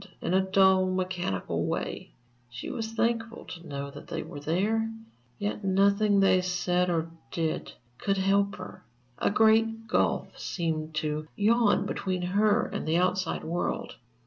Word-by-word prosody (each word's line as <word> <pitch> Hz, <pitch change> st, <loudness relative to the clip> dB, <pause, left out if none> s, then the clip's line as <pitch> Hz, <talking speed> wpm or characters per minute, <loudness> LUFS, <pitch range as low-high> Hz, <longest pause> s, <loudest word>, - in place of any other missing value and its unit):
In -, -, -2 dB
a 190 Hz, -, +5 dB
dull, 190 Hz, 0 st, +4 dB
mechanical 185 Hz, -, -2 dB
way, -, -, -3 dB, 0.4 s
she 120 Hz, -1 st, -6 dB
was 225 Hz, -1 st, -4 dB
thankful 230 Hz, 0 st, -1 dB
to 170 Hz, -1 st, -9 dB
know 140 Hz, -1 st, -5 dB
that 145 Hz, -, -11 dB
they -, -, -4 dB
were 145 Hz, -, -8 dB
there; 205 Hz, +9 st, 0 dB, 0.5 s
yet 205 Hz, 0 st, -3 dB
nothing 200 Hz, +2 st, +3 dB
they 185 Hz, -1 st, +5 dB
said 180 Hz, 0 st, 0 dB
or 165 Hz, -1 st, -1 dB, 0.2 s
did 160 Hz, +2 st, -2 dB, 0.3 s
could 195 Hz, -1 st, 0 dB
help 200 Hz, +1 st, +2 dB
her, 185 Hz, -, -9 dB, 0.4 s
a -, -, +2 dB
great 225 Hz, +1 st, +3 dB
gulf -, -, 0 dB
seemed 160 Hz, -3 st, -3 dB
to 155 Hz, 0 st, -2 dB
yawn 220 Hz, +1 st, +3 dB
between 185 Hz, -2 st, -2 dB
her 205 Hz, +5 st, +3 dB
and -, -, -5 dB
the 160 Hz, +2 st, +2 dB
outside 185 Hz, 0 st, 0 dB
world.... 170 Hz, +2 st, -2 dB
185 Hz, 145 wpm, -28 LUFS, 170-205 Hz, 0.5 s, a